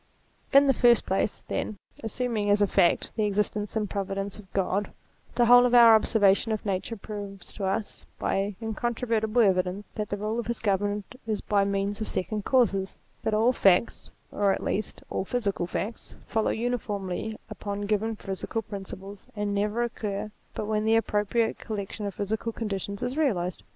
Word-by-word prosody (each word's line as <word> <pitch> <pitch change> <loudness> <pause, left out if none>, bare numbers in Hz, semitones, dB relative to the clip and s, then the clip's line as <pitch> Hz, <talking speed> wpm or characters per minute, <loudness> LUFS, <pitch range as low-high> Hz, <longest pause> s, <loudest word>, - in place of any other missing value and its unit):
In 275 0 +7
the 270 - +4
first 240 -2 +4
place, 195 +2 -1
then, 215 - -3 0.3
assuming 225 -2 -1
as 205 0 +4
a 205 - +5
fact 175 -3 +2
the 215 - +1
existence 210 +1 -1
and 215 -1 0
providence 195 0 -3
of 190 -3 -14
Grod, 195 +1 0 0.5
the 240 - +4
whole 245 +1 +8
of 245 0 +3
our 235 -2 +9
observation 215 -1 +4
of 215 -1 -2
Nature 200 +3 -2
proves 200 -2 -8
to 200 - -4
us 205 +3 -2
by 195 +1 -1
incontrover 230 +1 -1
tible 220 +1 +3
evidence 185 +1 +1
that 210 -1 -3
the 205 - -2
rule 215 +3 -2
of 235 - -4
his 235 -1 -2
government 205 0 -1
is 215 -2 0
by 200 -1 +1
means 200 +1 -1
of 220 - -1
second 205 +2 -2
causes: 200 -7 +2 0.2
that 220 - 0
all 230 +4 +4
facts, 195 -1 +3 0.2
or 200 -1 +2
at - - -2
least 215 +1 -2
all - - -1
physical 200 -5 -1
facts, 215 +5 -4
follow 220 -1 0
uniformly 215 -3 -2
upon 205 0 -4
given 215 +2 0
physical 205 +3 -4
conditions, 195 -1 -8
and 205 -1 -1
never 210 +3 0
occur 215 -3 -3 0.2
but - - -3
when 215 0 0
the 220 +1 +3
appropriate 225 +1 +1
collection 210 -1 -4
of 200 - -6
physical 220 +3 -2
conditions 200 -2 -4
is 250 +3 -2
realized. 185 - 0
210 Hz, 175 wpm, -27 LUFS, 200-225 Hz, 0.5 s, our